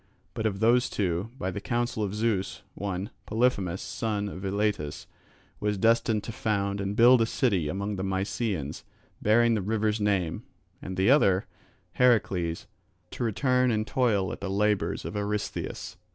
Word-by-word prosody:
But 110 - -1
of 100 -1 -3
those 120 +3 +4
two, 95 +1 -1
by 95 -4 -2
the 100 - -5
counsel 120 -1 -1
of 105 -1 -2
Zeus, 105 -3 -1
one, 100 0 -4 0.2
Polyphemus 105 -6 +1
son 105 -2 -2
of 95 0 -8
Eilatus, 100 -6 -1 0.5
was 105 -1 0
destined 115 0 +2
to - - -5
found 100 -4 -1
and 100 +1 -2
build 120 +2 +7
a 115 - +2
city 100 - +1
among 100 +5 -3
the 95 - -3
Mysians 95 - -2 0.4
bearing 115 +2 +4
the 110 - 0
river's 110 +1 0
name, 100 -5 0 0.4
and 95 0 -6
the 95 +6 +4
other, 100 -9 +4 0.5
Heracles, 95 -9 +2 0.5
to - - -4
return 125 +3 +2
and 110 -2 0
toil 110 -7 +1
at - - -7
the 100 - -3
labours 105 0 0
of - - -5
Eurystheus. 105 0 -3
105 Hz, 155 wpm, -27 LUFS, 95-115 Hz, 0.5 s, build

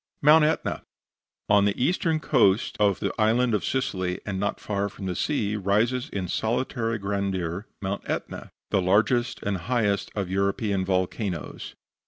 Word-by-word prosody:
MOUNT 155 +2 +7
ETNA 155 - -1 0.7
On 100 -1 +5
the 100 -1 0
eastern 165 +3 +1
coast 115 -9 +2
of 100 -2 +3
the - - -2
Island 115 +2 +3
of 105 - +1
Sicily, 95 -9 -1
and 95 -2 -3
not 100 +1 -1
far 100 -1 -2
from 100 -1 -9
the 90 -1 -2
sea, 105 - 0
rises 110 +5 +1
in 95 -2 -3
solitary 115 +2 -1
grandeur 100 -2 -2 0.2
Mount 95 +1 -2
Etna, - - -4 0.2
the 95 - +3
largest 110 +6 +2
and 100 -1 -1
highest 100 -1 0
of 100 -3 -1
European 100 +1 0
volcanoes. 95 - -3
100 Hz, 150 wpm, -26 LUFS, 95-120 Hz, 0.7 s, MOUNT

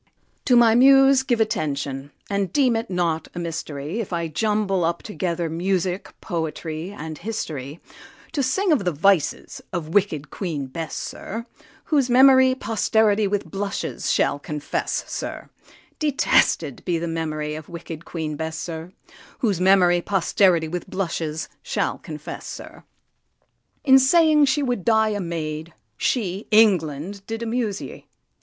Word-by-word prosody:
To 250 - +4
my 235 -2 +6
Muse 270 +2 +6
give 245 -3 0
attention, 145 -9 -2 0.2
and 200 -3 -1
deem 255 -1 +3
it 225 +1 -2
not 170 -3 -1
a - - -7
mystery 165 +1 -4
If 220 - -4
I 170 -1 -1
jumble 210 +1 0
up 170 +1 -1
together 175 -5 -2
music, 180 +3 -1
poetry, 160 0 -4
and 160 -5 -7
history, 155 - -5 0.5
To 295 - -1
sing 345 +9 +1
of 285 -10 +3
the 180 - +1
vices 165 0 +1
of 170 -4 -4
wicked 185 -8 +1
Queen 160 -8 -3
Bess, 155 +5 -6
sir, 230 +3 -6 0.4
Whose 280 -5 +1
memory 260 +1 +6
posterity 220 -2 +2
with 205 0 -1
blushes 200 0 -3
shall 145 - +1
confess, 150 0 -3
sir, - - -6 0.5
Detested 250 - +2
be 175 - 0
the 170 +1 -3
memory 155 -2 -3
of 155 0 -8
wicked 170 -1 -8
Queen 160 -4 -4
Bess, 160 +1 -4
sir, 165 +1 -6 0.5
Whose 200 -7 0
memory 180 -2 +5
posterity 185 -3 +2
with 175 +2 -5
blushes 160 -4 -3
shall - - -2
confess, - - -8
sir. - - -9 1.0
In 265 -1 +7
saying 305 +2 +5
she 280 +2 +1
would 245 -7 -1
die 220 0 +3
a 205 -1 -2
maid, 160 -2 -4 0.2
she, 200 - -1
England! 195 -4 +3
did 225 +1 -4
amuse 225 -3 -1
ye. - - -10
185 Hz, 140 wpm, -23 LUFS, 160-225 Hz, 1.0 s, In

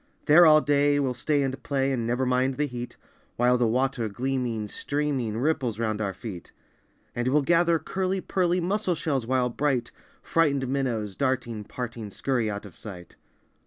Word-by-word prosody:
There 165 +3 +7
all 155 0 +7
day 145 0 +3
we'll 135 -3 0
stay 145 +3 0
and 135 0 -3
play 135 -1 0
and 120 -3 -1
Never 125 +2 0
mind 130 +1 +1
the 150 - 0
heat, 125 -3 -7 0.4
While 125 +1 +3
the 120 - +3
water 125 -1 0
gleaming, 120 -1 -2
streaming, 135 -3 -2
Ripples 130 -4 0
round 110 -2 -1
our 100 -2 -1
feet. 95 -2 -8 0.6
And 120 +1 -2
we'll 145 +3 +3
gather 170 +2 +3
curly 190 +4 -2
pearly 180 -1 0
Mussel 185 +1 0
shells 140 -7 -2
while 125 -1 +1
bright 130 -2 0 0.3
Frightened 140 -5 +1
minnows 120 -7 -2
darting, 125 -5 -1
parting, 115 -2 -6
Scurry 120 +1 -1
out 100 0 -5
of 100 - -12
sight. 90 -5 -10
130 Hz, 165 wpm, -26 LUFS, 115-145 Hz, 0.6 s, There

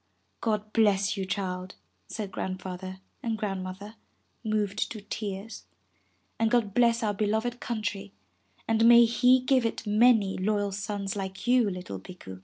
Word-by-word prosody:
'God 215 -1 -1
bless 200 -3 +3
you, 195 -2 -3
child,'' 185 -2 -3 0.3
said 205 -3 -5
Grandfather 185 0 -5 0.2
and 225 -2 -2
Grand 195 -3 -3
mother, 200 +4 -8 0.5
moved 215 -2 -1
to 220 - -6
tears. 200 - -6 0.7
''And 225 0 +3
God 230 -4 +1
bless 235 0 +3
our 210 -1 +1
beloved 220 +4 -1
country, 205 -3 -4 0.6
and 225 0 +3
may 235 0 +9
He 250 +2 +4
give 255 -1 +3
it 230 0 -2
many 210 -2 +4
loyal 205 +1 0
sons 200 0 -3
like 190 -1 -5
you, 245 -3 +4
little 180 - -6
Bikku. 95 - -11
210 Hz, 145 wpm, -28 LUFS, 190-225 Hz, 0.7 s, may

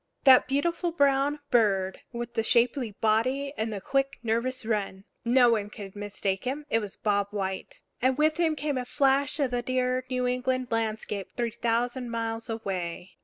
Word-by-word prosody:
That 260 -2 +7
beautiful 335 +6 0
brown 285 -1 +2
bird 195 -6 +2
with 235 -1 -5
the - - +1
shapely 235 0 +2
body 255 +6 +1
and 220 -2 -2
the 205 - -4
quick, 275 +6 0
nervous 235 +2 -1
run! 200 -3 -2 0.2
No 245 0 +5
one 210 -3 0
could 200 -2 -9
mistake 205 -2 -2
him; 285 +4 -3
it 225 - +4
was 205 -3 -6
Bob 205 -1 +1
White. 200 - -4 0.2
And 260 +1 +2
with 310 +1 +3
him 330 -2 +2
came 290 -2 -1
a 250 - -4
flash 275 +3 +2
of 275 -3 +1
the 245 0 0
dear 255 +1 0
New 250 -1 0
England 250 0 0
landscape 220 -3 -2
three 235 -2 0
thousand 240 +2 -1
miles 230 0 -3
away. 185 -5 -4
240 Hz, 170 wpm, -27 LUFS, 215-270 Hz, 0.2 s, That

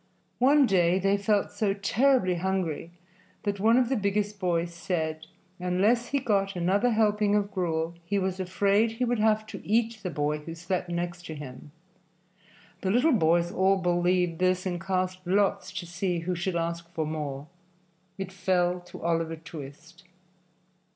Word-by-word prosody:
One 280 +3 +5
day 180 -4 +3
they 195 +1 +2
felt 205 0 +1
so 200 -3 0
terribly 215 0 +2
hungry 175 -3 -2 0.5
that 200 -1 -2
one 225 +4 +4
of 255 -2 +3
the 265 - 0
biggest 205 -1 -1
boys 170 -2 0
said 160 -2 -3 0.3
unless 200 +7 +2
he 280 - 0
got 200 -6 0
another 190 +7 +2
helping 210 -2 +2
of 205 0 0
gruel 165 -3 -1
he 195 +4 -1
was 190 -1 -1
afraid 200 +4 +2
he 250 +2 -1
would 240 -1 0
have 215 0 +2
to 220 - -8
eat 225 +1 +1
the 185 - -3
boy 150 -1 -1
who 165 +2 -8
slept 180 +1 -3
next 175 0 -4
him. 145 -2 -9 1.1
The 190 - -1
little 250 +9 +4
boys 170 -3 +3
all 190 +1 +3
believed 175 -1 +1
this 185 0 +1
and 175 -2 -2
cast 185 0 -1
lots 195 0 +1
to 180 -1 -5
see 175 0 -2
who 180 +2 -2
should 175 +1 -2
ask 170 0 -2
for 160 -2 0
more. 150 -3 -4 0.7
It 190 -1 -5
fell 180 -2 +1
to 175 -2 -12
Oliver 165 -1 0
Twist. 160 +2 -11
185 Hz, 160 wpm, -27 LUFS, 170-205 Hz, 1.1 s, One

